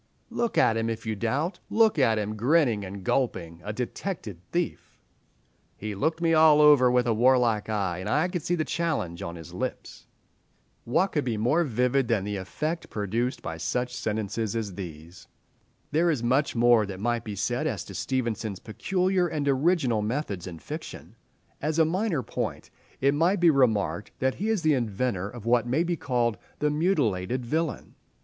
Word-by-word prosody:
"Look 235 -1 -1
at 115 - +4
him, 115 0 0
if 115 0 -4
you 110 -1 -1
doubt; 135 - -1
look 220 -7 +3
at 115 -5 +3
him, 105 0 -2
grinning 120 -2 +2
and 95 0 -7
gulping, 90 -8 -1
a 105 - -4
detected 120 - -5
thief. 175 -1 -3 0.8
"He 105 0 -5
looked 160 - -1
me 165 -1 +3
all 155 -1 +6
over 145 -4 +7
with 125 -1 +3
a 115 - +2
warlike 120 -2 +3
eye, 95 -5 -1
and 95 +3 -4
I 150 +8 +2
could 180 -2 -3
see 175 - 0
the 155 -2 -1
challenge 150 - -2
on 85 0 -5
his 80 -2 -10
lips." - - -5 0.8
What 185 +11 +2
could 150 - 0
be 120 -4 -2
more 125 +11 +2
vivid 125 -1 +1
than 115 -5 +1
the 105 0 -3
effect 155 - -4
produced 115 +5 -2
by 80 - -5
such 125 +8 -2
sentences 110 -1 -2
as 110 -4 -3
these? 85 -1 -9 0.6
There 170 +3 +3
is 140 -8 0
much 130 +5 +1
more 120 -3 +4
that 95 -2 -7
might 120 +2 -1
be 105 -2 -5
said 120 +8 -1
as - - -2
to - - -10
Stevenson's 115 -6 -2
peculiar 185 - 0
and 150 -3 -2
original 135 -5 +2
methods 105 - -3
in 85 -2 -7
fiction. - - -8 0.5
As 155 +2 -1
a 160 - +5
minor 175 - 0
point, - - -4 0.3
it 140 +1 +4
might 170 +6 +2
be 170 -1 +6
remarked 110 -7 +1
that 130 0 +1
he 215 - 0
is 220 -6 0
the 155 -1 +4
inventor 110 -5 -1
of 115 -1 -10
what 120 0 +2
may 140 +7 +2
be 175 0 -1
called 120 - 0 0.2
the 150 0 +1
mutilated 130 - 0
villain. 160 +4 -2
125 Hz, 180 wpm, -27 LUFS, 105-155 Hz, 0.8 s, over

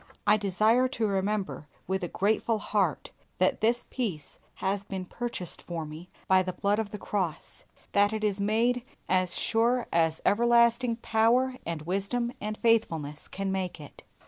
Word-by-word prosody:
I 210 +1 +6
desire 215 +5 +3
to 235 -3 -2
remember 195 -5 -1 0.2
with 190 +1 -2
a - - -1
grateful 215 +5 +1
heart 200 -6 -1 0.3
that 185 - +2
this 235 +2 +2
peace 190 - -4 0.2
has 195 +1 -1
been 190 -2 -5
purchased 235 -4 -5
for 165 -2 -5
me 155 +4 -10 0.2
by 190 0 +5
the 185 0 -3
blood 205 +3 +1
of 220 -2 -2
the 210 - -6
cross 190 -6 -4 0.3
that 205 +1 +4
it 220 -1 -3
is 205 -1 0
made 230 +4 +2 0.2
as 185 -1 +1
sure 235 +2 +2
as 160 -1 +2
everlasting 235 +2 +4
power 240 +4 +3
and 165 -2 -3
wisdom 200 +8 -1
and 215 0 -3
faithfulness 165 -11 +1
can 195 0 -3
make 185 -3 -3
it. 145 - -12
205 Hz, 160 wpm, -28 LUFS, 185-230 Hz, 0.3 s, I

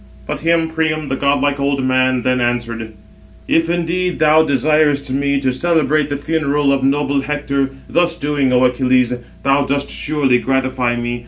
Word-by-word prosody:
But - - -4
him 165 0 +1
Priam, 155 -2 -2
the 135 - -1
godlike 140 0 0
old 140 -1 0
man, 130 -1 +1
then 125 -1 +1
answered: 115 -2 -3 0.5
"If 165 0 +1
indeed 175 +1 -1
thou 155 0 +4
desirest 145 -1 +1
me 140 +1 0
to 135 -1 0
celebrate 155 -1 +1
the 145 - -2
funeral 145 -2 0
of 135 -1 -1
noble 140 0 +1
Hector, 140 -1 -2 0.2
thus 170 -1 0
doing, 145 -3 0
O 125 0 +3
Achilles, 125 -1 +2 0.3
thou 140 +1 +2
dost 140 0 -2
surely 145 -5 0
gratify 130 -2 -1
me. 120 0 -3
140 Hz, 160 wpm, -17 LUFS, 130-155 Hz, 0.5 s, thou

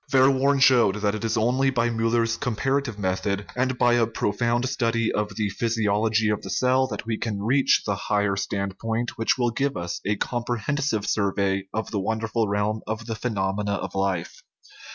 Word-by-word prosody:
Verworn 135 +1 +4
showed 120 -7 +5
that 105 -1 0
it 110 - -4
is 115 0 0
only 125 +5 +2
by 120 -2 +1
Miil 115 0 0
ler's 115 -1 +2
comparative 125 +1 -1
method 100 +1 -1
and 130 0 0
by 120 0 +4
a 120 -2 +3
profound 120 +3 0
study 115 -2 0
of 105 -1 -2
the 105 -2 -1
physiology 110 0 +1
of 105 - -2
the - - -8
cell 130 +1 +2
that - - -6
we 110 -1 -2
can 105 -3 -3
reach 130 +5 +3
the 100 - 0
higher 100 0 0
stand 100 -1 -3
point 115 +1 -2
which 115 - +2
will 120 -2 +1
give 140 +4 -1
us 85 0 -4
a 105 - 0
comprehensive 120 +1 -2
survey 100 -2 0
of 110 0 -3
the 105 - -1
wonderful 110 +2 -1
realm 105 +2 -1
of 110 +1 -4
the 115 - -3
phenomena 100 -3 -1
of - - -4
life. 95 -3 -2
110 Hz, 185 wpm, -24 LUFS, 105-120 Hz, -, showed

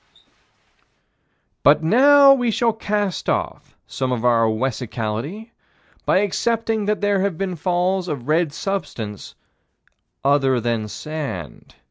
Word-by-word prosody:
But 150 +2 +4
now 275 - +6
we 245 -3 0
shall 230 +1 +1
cast 205 -3 -2
off - - -3
some 130 -1 -3
of 125 -1 -2
our 115 -2 +4
own 110 -1 0
wessicality 125 - -4 0.6
by 190 - +3
accepting 225 +1 -1
that 210 0 -1
there 205 -1 +1
have 195 -4 -1
been 190 -1 -3
falls 180 +3 0
of 140 -6 -5
red 160 0 +1
substance 145 - -5 0.9
other 135 -2 +2
than 115 -2 -2
sand. 140 - -7
165 Hz, 120 wpm, -21 LUFS, 125-205 Hz, 0.9 s, now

